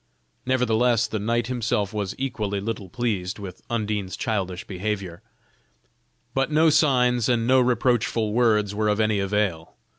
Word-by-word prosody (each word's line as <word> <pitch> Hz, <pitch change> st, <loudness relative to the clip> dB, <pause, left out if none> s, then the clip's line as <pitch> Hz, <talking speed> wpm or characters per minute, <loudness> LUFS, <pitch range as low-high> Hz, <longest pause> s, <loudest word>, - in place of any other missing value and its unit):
Nevertheless, 120 Hz, -2 st, +2 dB
the 110 Hz, -1 st, -3 dB
knight 115 Hz, +3 st, 0 dB
himself 110 Hz, -5 st, -1 dB
was 100 Hz, -3 st, -3 dB
equally 105 Hz, -7 st, -2 dB
little 100 Hz, -2 st, -5 dB
pleased 105 Hz, -5 st, -2 dB
with 95 Hz, -4 st, -9 dB
Undine's 105 Hz, -4 st, -2 dB
childish 95 Hz, -5 st, -2 dB
behavior: 95 Hz, -2 st, -4 dB, 1.1 s
but 135 Hz, +1 st, 0 dB
no 155 Hz, +1 st, +4 dB
signs, 125 Hz, -5 st, +3 dB
and 115 Hz, -2 st, +2 dB
no 130 Hz, +2 st, +5 dB
reproachful 120 Hz, -3 st, +1 dB
words 110 Hz, -4 st, +2 dB
were 105 Hz, +1 st, 0 dB
of 105 Hz, 0 st, +1 dB
any 110 Hz, -2 st, +2 dB
avail. 100 Hz, -5 st, -1 dB
110 Hz, 140 wpm, -24 LUFS, 100-120 Hz, 1.1 s, no